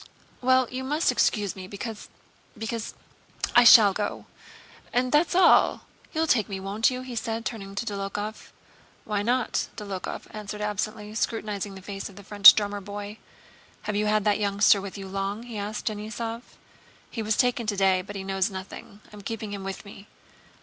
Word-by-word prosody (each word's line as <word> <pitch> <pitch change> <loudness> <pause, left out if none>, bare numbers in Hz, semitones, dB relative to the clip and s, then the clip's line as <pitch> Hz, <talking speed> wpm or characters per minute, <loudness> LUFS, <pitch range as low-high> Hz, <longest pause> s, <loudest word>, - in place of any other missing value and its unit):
"Well, 255 0 +4
you 255 +1 -4
must 300 +5 +1
excuse 205 -4 +1
me, 185 -1 -8
because... 210 +2 -7 0.5
because... 225 0 -4 0.6
I 245 - +8
shall 215 -4 +9
go, 205 - -3 0.7
and 250 +1 +1
that's 310 +4 +3
all. 365 -1 +5 0.3
You'll 320 0 0
take 235 -10 +2
me, 195 -1 -4
won't 200 +4 +1
you?" 255 0 -5
he 255 -2 -7
said, 225 -1 -3
turning 195 -4 -5
to 220 - -2
Dólokhov. 205 0 -5 0.6
"Why 210 -2 -1
not?" 245 +3 0
Dólokhov 200 -4 -5
answered 210 0 -7
absently, 210 +1 -3
scrutinizing 210 -3 -3
the 190 - -11
face 195 0 -6
of 195 - -15
the 200 - -12
French 205 +1 +9
drummer 205 -1 -2
boy. 205 +2 -7 0.6
"Have 210 - -3
you 210 +1 +1
had 215 0 +2
that 210 0 +2
youngster 200 0 +4
with 200 0 -7
you 195 -1 -7
long?" 195 +3 -3
he 235 -3 -7
asked 210 +1 -5
Denísov. 225 +2 -4 0.7
"He 225 - -4
was 215 -1 0
taken 245 -2 +1
today 195 -3 +2
but 205 +2 -10
he 195 - -4
knows 195 +1 0
nothing. 195 +1 -9
I'm 210 - -10
keeping 215 0 -5
him 200 -1 -5
with 195 +2 -6
me." 200 0 -12
210 Hz, 175 wpm, -26 LUFS, 200-225 Hz, 0.7 s, shall